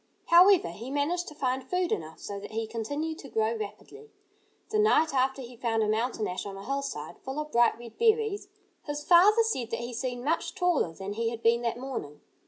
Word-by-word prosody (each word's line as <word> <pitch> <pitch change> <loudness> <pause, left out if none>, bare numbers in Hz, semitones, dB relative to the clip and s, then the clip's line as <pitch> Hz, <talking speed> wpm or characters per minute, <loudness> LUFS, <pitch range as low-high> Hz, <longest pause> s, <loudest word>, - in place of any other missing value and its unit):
However, 355 - +6
he 230 +8 -8
managed 300 +6 -1
to 305 - -9
find 260 -2 -1
food 360 +6 -1
enough 160 0 -3
so 200 0 -6
that 205 - -10
he 225 0 -1
continued 285 +9 -4
to 275 - -10
grow 220 0 +1
rapidly. 410 - -8 0.6
The 430 - +2
night 320 -8 +4
after 265 0 +1
he 245 0 -10
found 225 -2 0
a - - 0
mountain 220 0 0
ash 180 0 -4
on 195 -1 -7
a 195 - -9
hillside, 275 - -4
full 265 +3 -5
of 300 0 -5
bright 235 -1 +4
red 235 -1 -12
berries, 440 -3 +2 0.4
his 290 0 -3
father 400 +8 +6
said 260 - -2
that - - -3
he 240 +1 -5
seemed 245 +1 -4
much 325 +3 -1
taller 355 - +1
than 195 +4 -6
he 230 +2 -1
had 230 0 -7
been 230 +1 +4
that 235 -1 -1
morning. 245 - -6
255 Hz, 210 wpm, -28 LUFS, 225-320 Hz, 0.6 s, However